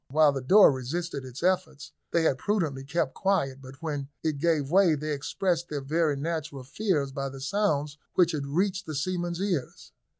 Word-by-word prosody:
While 150 Hz, +1 st, +5 dB
the 135 Hz, -1 st, -3 dB
door 195 Hz, +10 st, +7 dB
resisted 140 Hz, +3 st, -4 dB
its 130 Hz, +4 st, -8 dB
efforts 155 Hz, -6 st, 0 dB, 0.2 s
they 170 Hz, -, +2 dB
had 135 Hz, -5 st, +2 dB
prudently 160 Hz, -10 st, -1 dB
kept 140 Hz, 0 st, -1 dB
quiet, 140 Hz, -9 st, 0 dB
but 135 Hz, +4 st, -13 dB
when 145 Hz, -4 st, -3 dB
it 155 Hz, -3 st, -1 dB
gave 155 Hz, -3 st, +1 dB
way, 185 Hz, -3 st, +5 dB
they 150 Hz, +1 st, -3 dB
expressed 175 Hz, +4 st, -1 dB
their 150 Hz, -, -2 dB
very 155 Hz, 0 st, +1 dB
natural 150 Hz, -3 st, -4 dB
fears 145 Hz, -1 st, -1 dB
by 135 Hz, 0 st, -3 dB
the 135 Hz, 0 st, -9 dB
sounds 150 Hz, -2 st, 0 dB, 0.2 s
which 175 Hz, -2 st, +4 dB
had 145 Hz, -3 st, -3 dB
reached 185 Hz, +6 st, 0 dB
the 155 Hz, -, -4 dB
seamen's 175 Hz, +3 st, -2 dB
ears. 185 Hz, -9 st, -3 dB
155 Hz, 180 wpm, -27 LUFS, 140-175 Hz, 0.2 s, door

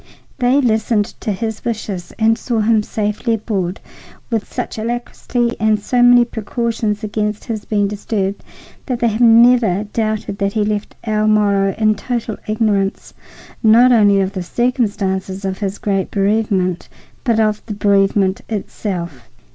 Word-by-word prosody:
They 250 Hz, +3 st, +3 dB
listened 220 Hz, -4 st, +1 dB
to 220 Hz, -, -2 dB
his 220 Hz, +2 st, -4 dB
wishes 205 Hz, -6 st, -4 dB
and 225 Hz, 0 st, +3 dB
saw 230 Hz, -1 st, -2 dB
him 220 Hz, 0 st, +3 dB
safely 210 Hz, +2 st, -1 dB
aboard, 200 Hz, -4 st, -3 dB, 0.5 s
with 225 Hz, -2 st, -2 dB
such -, -, -4 dB
alacrity 240 Hz, +1 st, -2 dB
and 220 Hz, 0 st, +3 dB
with 210 Hz, -, -8 dB
so 250 Hz, -1 st, +1 dB
many 245 Hz, 0 st, +6 dB
precautions 225 Hz, -1 st, -2 dB
against 210 Hz, 0 st, -2 dB
his 220 Hz, -2 st, -5 dB
being 205 Hz, -2 st, +1 dB
disturbed 200 Hz, -1 st, -3 dB, 0.4 s
that 250 Hz, -3 st, -1 dB
they 235 Hz, 0 st, +1 dB
have 220 Hz, +2 st, -2 dB
never 230 Hz, -4 st, +5 dB
doubted 215 Hz, -1 st, -3 dB
that 200 Hz, 0 st, 0 dB
he 215 Hz, -2 st, +1 dB
left 210 Hz, 0 st, -3 dB
El 215 Hz, -1 st, 0 dB
Moro 200 Hz, -2 st, +2 dB
in 215 Hz, -1 st, +3 dB
total 225 Hz, +1 st, -4 dB
ignorance, 210 Hz, -2 st, -1 dB, 0.5 s
not 235 Hz, +3 st, +6 dB
only 205 Hz, -4 st, +5 dB
of 190 Hz, 0 st, -2 dB
the 190 Hz, -, -3 dB
circumstances 195 Hz, -3 st, -1 dB
of 190 Hz, 0 st, -3 dB
his 200 Hz, -1 st, -3 dB
great 195 Hz, -2 st, -1 dB
bereavement, 195 Hz, -3 st, 0 dB, 0.3 s
but 230 Hz, -4 st, +1 dB
of 215 Hz, -1 st, +1 dB
the 210 Hz, -, -4 dB
bereavement 195 Hz, -1 st, +2 dB
itself. 180 Hz, -, -5 dB
215 Hz, 150 wpm, -18 LUFS, 200-230 Hz, 0.5 s, many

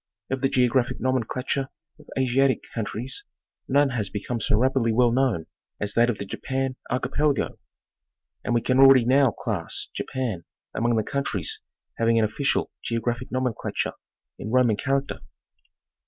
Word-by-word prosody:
Of 130 Hz, -1 st, -1 dB
the 135 Hz, -, +2 dB
geographic 125 Hz, -1 st, +2 dB
nomenclature 130 Hz, +1 st, -1 dB, 0.3 s
of 150 Hz, -, -18 dB
Asiatic 130 Hz, +1 st, +2 dB
countries 115 Hz, +3 st, -3 dB, 0.4 s
none 140 Hz, +1 st, +3 dB
has 110 Hz, -6 st, -1 dB
become 105 Hz, +5 st, -3 dB
so 105 Hz, -, +2 dB
rapidly 130 Hz, -1 st, +2 dB
well 120 Hz, +1 st, +4 dB
known 120 Hz, -10 st, +1 dB, 0.3 s
as 105 Hz, 0 st, -2 dB
that 120 Hz, +1 st, +4 dB
of 115 Hz, -, -1 dB
the 100 Hz, -, -5 dB
Japan 130 Hz, +6 st, -3 dB
Archipelago, 135 Hz, +3 st, 0 dB, 0.4 s
— -, -, -56 dB
and 120 Hz, -, 0 dB
we 120 Hz, -, +3 dB
can 130 Hz, +2 st, +1 dB
already 135 Hz, -3 st, +8 dB
now 135 Hz, +1 st, +5 dB
class 105 Hz, -7 st, -3 dB
Japan 115 Hz, -10 st, -3 dB, 0.3 s
among 120 Hz, +1 st, +1 dB
the 110 Hz, -, +1 dB
countries 105 Hz, -, -2 dB, 0.4 s
having 115 Hz, 0 st, +3 dB
an 110 Hz, -, +4 dB
official 140 Hz, +6 st, 0 dB
geographic 120 Hz, +1 st, -2 dB
nomenclature 130 Hz, -3 st, -2 dB, 0.5 s
in -, -, -5 dB
Roman 125 Hz, -2 st, +4 dB
character. 135 Hz, +5 st, -1 dB
125 Hz, 145 wpm, -25 LUFS, 115-135 Hz, 0.5 s, already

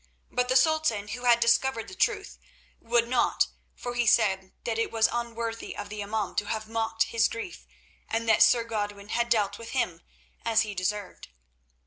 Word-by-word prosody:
But 250 Hz, 0 st, 0 dB
the 255 Hz, -, +2 dB
Sultan, 260 Hz, -8 st, +2 dB
who 245 Hz, +4 st, -5 dB
had 240 Hz, -1 st, +6 dB
discovered 235 Hz, 0 st, +2 dB
the -, -, -10 dB
truth, -, -, -1 dB, 0.4 s
would 235 Hz, 0 st, +1 dB
not, 245 Hz, 0 st, +2 dB, 0.3 s
for 245 Hz, -, -5 dB
he 240 Hz, -1 st, 0 dB
said 190 Hz, -4 st, +3 dB
that 230 Hz, -1 st, -2 dB
it 230 Hz, -, 0 dB
was 225 Hz, -1 st, +4 dB
unworthy 230 Hz, -1 st, -4 dB
of 205 Hz, -, -6 dB
the 210 Hz, 0 st, -5 dB
imaum 205 Hz, -2 st, -3 dB
to 205 Hz, -, +1 dB
have 215 Hz, +1 st, -3 dB
mocked 225 Hz, 0 st, 0 dB
his 230 Hz, -1 st, +2 dB
grief, 230 Hz, +10 st, -7 dB, 0.4 s
and 230 Hz, +1 st, -1 dB
that 220 Hz, -, +4 dB
Sir 235 Hz, -2 st, +6 dB
Godwin 205 Hz, -2 st, -4 dB
had 235 Hz, +1 st, 0 dB
dealt 205 Hz, -3 st, +1 dB
with 230 Hz, -1 st, -8 dB
him 180 Hz, -10 st, -1 dB, 0.4 s
as 225 Hz, -1 st, +3 dB
he 210 Hz, -2 st, -3 dB
deserved. 195 Hz, +1 st, -3 dB
225 Hz, 180 wpm, -27 LUFS, 210-235 Hz, 0.4 s, had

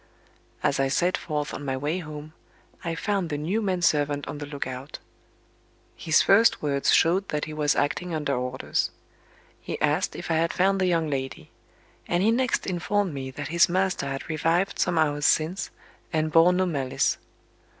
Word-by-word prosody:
As 140 Hz, -2 st, +1 dB
I 135 Hz, -, +3 dB
set 175 Hz, +7 st, +1 dB
forth 150 Hz, -2 st, -3 dB
on 145 Hz, -, -6 dB
my 135 Hz, -2 st, -2 dB
way 150 Hz, +7 st, -1 dB
home, 155 Hz, -2 st, -8 dB, 0.5 s
I 165 Hz, -1 st, -2 dB
found 195 Hz, -1 st, -1 dB
the 145 Hz, -, -2 dB
new 180 Hz, +10 st, -1 dB
man 185 Hz, -4 st, -1 dB
servant 145 Hz, -3 st, +1 dB
on 145 Hz, -, -6 dB
the 145 Hz, -, -6 dB
look 145 Hz, -1 st, -4 dB
out. 130 Hz, +2 st, -7 dB, 1.0 s
His 160 Hz, -, +3 dB
first 225 Hz, +4 st, +5 dB
words 140 Hz, -2 st, +1 dB
showed 185 Hz, +4 st, +3 dB
that 150 Hz, 0 st, -1 dB
he 155 Hz, -, -7 dB
was 150 Hz, -1 st, +1 dB
acting 175 Hz, +5 st, -1 dB
under 150 Hz, -3 st, -1 dB
orders. 125 Hz, +1 st, -1 dB, 0.7 s
He -, -, -5 dB
asked -, -, +1 dB
if -, -, -5 dB
I 160 Hz, -, +2 dB
had 165 Hz, +1 st, +1 dB
found 195 Hz, +1 st, +2 dB
the 185 Hz, -, +3 dB
young 165 Hz, -3 st, +1 dB
lady; 135 Hz, -2 st, -4 dB, 0.6 s
and 175 Hz, +2 st, +1 dB
he 220 Hz, -, +4 dB
next 255 Hz, +1 st, +1 dB
informed 190 Hz, 0 st, -1 dB
me 135 Hz, -1 st, -5 dB
that 145 Hz, +1 st, -6 dB
his 170 Hz, +2 st, +4 dB
master 185 Hz, -5 st, 0 dB
had 135 Hz, 0 st, -5 dB
revived 165 Hz, +4 st, 0 dB
some 175 Hz, -2 st, +1 dB
hours 145 Hz, -2 st, +2 dB
since, 170 Hz, +4 st, +1 dB, 0.4 s
and 155 Hz, -1 st, 0 dB
"bore 165 Hz, +3 st, +6 dB
no 185 Hz, +1 st, +2 dB
malice." 140 Hz, -7 st, 0 dB
155 Hz, 180 wpm, -26 LUFS, 145-180 Hz, 1.0 s, bore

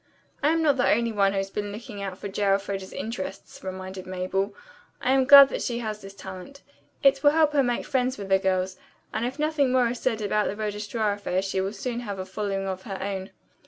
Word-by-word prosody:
"I 290 Hz, -, +3 dB
am 325 Hz, 0 st, +2 dB
not 290 Hz, -3 st, +3 dB
the 250 Hz, -, +3 dB
only 230 Hz, +1 st, +2 dB
one 200 Hz, -2 st, +2 dB
who -, -, -2 dB
has 195 Hz, 0 st, -2 dB
been 205 Hz, 0 st, -3 dB
looking 210 Hz, -1 st, -8 dB
out 190 Hz, -2 st, -5 dB
for 200 Hz, -, -6 dB
J. 195 Hz, +1 st, -5 dB
Elfreda's 195 Hz, -1 st, 0 dB
interests," 195 Hz, -4 st, -6 dB
reminded 185 Hz, 0 st, -6 dB
Mabel. 185 Hz, +2 st, -2 dB, 0.4 s
"I 255 Hz, -, +1 dB
am 265 Hz, -1 st, +4 dB
glad 280 Hz, +1 st, +10 dB
that -, -, -3 dB
she 235 Hz, -, -2 dB
has 215 Hz, -3 st, -4 dB
this 195 Hz, 0 st, -11 dB
talent. 190 Hz, +8 st, -10 dB, 0.4 s
It 275 Hz, 0 st, +5 dB
will 290 Hz, -, +7 dB
help 310 Hz, 0 st, +3 dB
her 290 Hz, -, +3 dB
to -, -, +5 dB
make 245 Hz, -1 st, -1 dB
friends 260 Hz, -2 st, 0 dB
with 200 Hz, -1 st, -7 dB
the 190 Hz, 0 st, +4 dB
girls, 185 Hz, -1 st, 0 dB, 0.4 s
and 225 Hz, +3 st, 0 dB
if 260 Hz, -, -6 dB
nothing 300 Hz, -3 st, +1 dB
more 250 Hz, -2 st, +3 dB
is 240 Hz, 0 st, -4 dB
said 230 Hz, -4 st, 0 dB
about 210 Hz, 0 st, +1 dB
the -, -, -3 dB
registrar 210 Hz, 0 st, -1 dB
affair 190 Hz, -2 st, -1 dB
she 190 Hz, -1 st, -1 dB
will 195 Hz, +1 st, -2 dB
soon 235 Hz, +3 st, -4 dB
have 205 Hz, -5 st, -5 dB
a 185 Hz, -, -4 dB
following 195 Hz, 0 st, -3 dB
of 190 Hz, -1 st, -4 dB
her 195 Hz, -2 st, -6 dB
own." 190 Hz, 0 st, -4 dB
205 Hz, 235 wpm, -26 LUFS, 195-250 Hz, 0.4 s, glad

